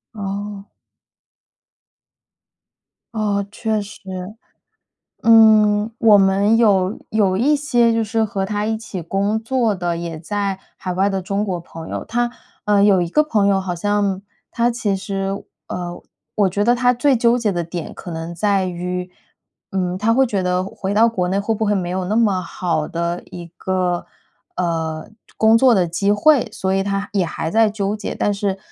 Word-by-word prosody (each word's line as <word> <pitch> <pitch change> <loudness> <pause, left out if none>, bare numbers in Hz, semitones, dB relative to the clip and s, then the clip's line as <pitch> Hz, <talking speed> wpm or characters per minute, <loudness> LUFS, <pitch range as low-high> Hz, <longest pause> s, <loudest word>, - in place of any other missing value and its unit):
哦。 200 0 -5 2.5
哦， 205 -2 0
确 220 -1 -1
实。 205 +1 -10 1.2
嗯， 215 -1 +5
我 220 -2 +6
们 200 +2 +3
有 200 -2 +3
有 205 -4 +2
一 270 +9 +3
些 240 -5 +2
就 225 0 +1
是 225 +1 0
和 195 -2 -2
他 210 0 -2
一 220 0 -1
起 215 -5 -7
工 200 +5 0
作 230 -1 0
的 175 -2 -2
也 170 -2 -5
在 200 +3 -2 0.2
海 180 -1 -4
外 195 +2 +2
的 195 -1 -1
中 195 +3 -2
国 185 -4 -3
朋 165 -1 -10
友。 - - -4
他， 240 +1 0 0.3
呃， 205 -1 +3
有 200 -3 +4
一 170 - -2
个 300 - +3
朋 220 -10 +1
友 195 -1 +3
好 185 -2 -3
像 200 +1 0 0.3
他 235 +1 +1
其 225 -5 -1
实， 195 0 -4 0.2
呃， 175 -1 -5 0.4
我 205 -2 +3
觉 200 +3 -1
得 240 +2 +4
他 245 0 +2
最 270 +3 +3
纠 235 0 +3
结 225 -4 0
的 175 -1 -1
点 170 0 -6
可 175 - -9
能 165 +1 -5
在 200 +1 +1
于， 180 0 -4 0.6
嗯 185 -1 -1
他 225 +3 +2
会 265 +2 +4
觉 200 -5 -1
得 180 0 0
回 195 +1 -4
到 220 +2 +5
国 185 -6 -1
内 190 +2 0
会 205 +3 0
不 220 +1 -1
会 210 - +2
没 180 -3 -2
有 185 0 -2
那 210 +4 0
么 205 -5 +2
好 170 -3 -2
的 170 +1 -3
一 175 -1 -9
个， 180 -2 -1 0.5
呃， 165 -3 -2 0.3
工 220 +1 +5
作 255 -1 +5
的 185 -4 +2
机 185 +4 0
会， 245 +4 +4
所 190 -2 -2
以 195 - +1
他 200 +1 -3
也 195 -4 +1
还 160 0 -4
在 225 +2 +4
纠 205 -1 -2
结。 210 - -5
但 205 - 0
是， 200 -1 -2
200 Hz, 190 characters per minute, -20 LUFS, 185-220 Hz, 2.5 s, 我